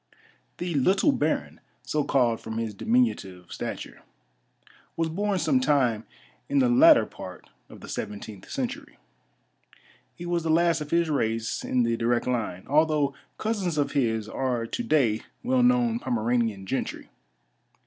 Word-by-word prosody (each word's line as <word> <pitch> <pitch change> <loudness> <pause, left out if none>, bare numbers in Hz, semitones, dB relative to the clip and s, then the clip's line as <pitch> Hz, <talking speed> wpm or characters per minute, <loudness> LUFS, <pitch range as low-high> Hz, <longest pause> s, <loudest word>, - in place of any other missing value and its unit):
The 175 -1 -3
"Little 190 - +3
Baron," 275 - -1 0.2
so 150 -1 -1
called 120 -5 +2
from 110 0 -6
his 115 -2 -2
diminutive 100 - 0
stature, - - -6 1.0
was 165 -1 0
born 200 +4 -1
some 155 -6 +2
time 130 -5 +1 0.4
in 285 - +1
the 260 -2 +4
latter 305 +6 +7
part - - -11 0.2
of - - -13
the - - -10
seventeenth - - -6
century. 275 +3 -5 1.2
He 175 - -8
was 175 -1 0
the 165 - -3
last 165 0 +3
of 150 - -6
his 170 +1 +2
race 115 -4 -1
in 125 -1 +1
the 115 0 0
direct 120 +1 +1
line, 110 -8 -2
although 150 -1 +2 0.2
cousins 200 -7 -1
of 145 -1 +1
his 115 -6 0
are 125 -1 -2
to 115 - -4
day 130 - +2 0.2
well 255 +1 +2
known 245 -2 +3
Pomeranian 115 - -1
gentry. - - -4
150 Hz, 145 wpm, -26 LUFS, -, 1.2 s, latter